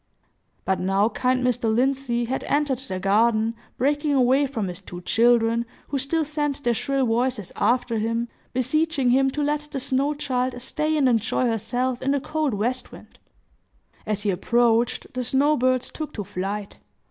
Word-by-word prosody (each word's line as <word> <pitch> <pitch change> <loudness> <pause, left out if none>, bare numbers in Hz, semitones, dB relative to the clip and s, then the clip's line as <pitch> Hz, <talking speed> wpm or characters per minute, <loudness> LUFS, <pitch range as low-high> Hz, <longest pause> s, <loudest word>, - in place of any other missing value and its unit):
But 190 -1 +1
now 195 +4 +2
kind 255 +1 0
Mr. 245 -2 +1
Lindsey 250 0 +1
had 260 +3 -3
entered 285 -3 +1
the 260 -8 -5
garden, 220 +3 +2 0.2
breaking 290 +3 +1
away 265 +2 +3
from 225 -7 -3
his 180 +1 -7
two 175 -2 -9
children, 230 +2 +3 0.3
who 280 - -1
still 310 +4 0
sent 295 -1 -2
their 240 - +2
shrill 275 +3 0
voices 240 -3 0
after 235 0 +1
him, 230 +2 -1 0.2
beseeching 270 +1 +1
him 270 +1 +4
to 295 +2 -2
let 295 +1 -1
the 275 - -4
snow 275 +2 0
child 255 -3 -2
stay 305 +5 -1
and 280 -3 +3
enjoy 235 +1 +1
herself 245 +2 -1
in 270 - -1
the 280 0 +2
cold 305 -3 -1
west 245 +5 -2
wind. - - -15 0.9
As 210 -1 -1
he 205 - +2
approached, 235 +5 +2
the 255 0 -2
snow 275 +5 +3
birds 255 -1 +1
took 310 -1 -6
to 205 - -3
flight. 200 +1 -5
250 Hz, 170 wpm, -24 LUFS, 225-275 Hz, 0.9 s, him